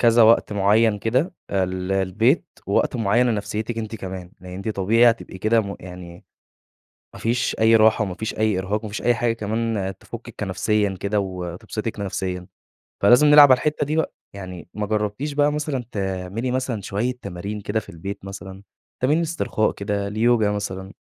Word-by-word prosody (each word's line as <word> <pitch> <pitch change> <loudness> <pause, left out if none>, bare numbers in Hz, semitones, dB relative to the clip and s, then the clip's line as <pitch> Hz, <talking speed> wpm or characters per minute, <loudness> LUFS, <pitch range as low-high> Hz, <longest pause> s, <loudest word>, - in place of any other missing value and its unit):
كذا 120 0 +5
وقت 115 -1 +5
مُعيّن 105 +2 +3
كده 130 - 0 0.2
آآ 95 -2 +1
للبيت، 95 - +1 0.2
ووقت 100 +5 +1
مُعيّن 115 +2 +2
لنفسيتك 110 0 -2
أنتِ 110 0 -4
كمان، 95 -2 -7
لأن 90 0 -10
أنتِ 100 +4 -5
طبيعي 110 +4 +4
هتبقي 115 -4 -6
كده 110 +4 +3
م 100 -2 -5
يعني 90 -1 -10 0.9
ما - - -10
فيش 120 +1 0
أي 110 +1 +6
راحة 110 0 +4
وما 95 -3 -4
فيش 110 +4 -4
أي 110 -3 +2
إرهاق 100 +3 -1
وما 110 - -5
فيش 105 - -5
أي 120 - +3
حاجة 120 +1 +1
كمان 110 -3 -2
تفكِك - - -10
كنفسيًا 105 -2 0
كده 100 +1 0
وتبسطِك 95 +4 -5
نفسيًا. 90 -2 -3 0.6
فلازم 120 +8 +7
نلعب 145 -1 +9
على 130 - +7
الحتة 150 +2 -1
دي 150 +2 -2
بقى، 160 - 0 0.2
يعني 90 -4 -8
ما 105 0 -2
جربتيش 105 +7 -2
بقى 145 0 +3
مثلًا 145 -4 -2
تعملي 95 +4 -3
مثلًا 130 -4 -2
شوية 105 +6 -1
تمارين 100 +1 -5
كده 105 +2 -1
في 110 - -13
البيت 95 +4 -7
مثلًا؟ 95 0 -9 0.4
تمارين 150 +6 +3
إسترخاء 160 -9 0
كده 100 0 -3
اليوجا 110 0 +2
مثلًا؟ 95 -1 -4
105 Hz, 170 wpm, -23 LUFS, 95-115 Hz, 0.9 s, نلعب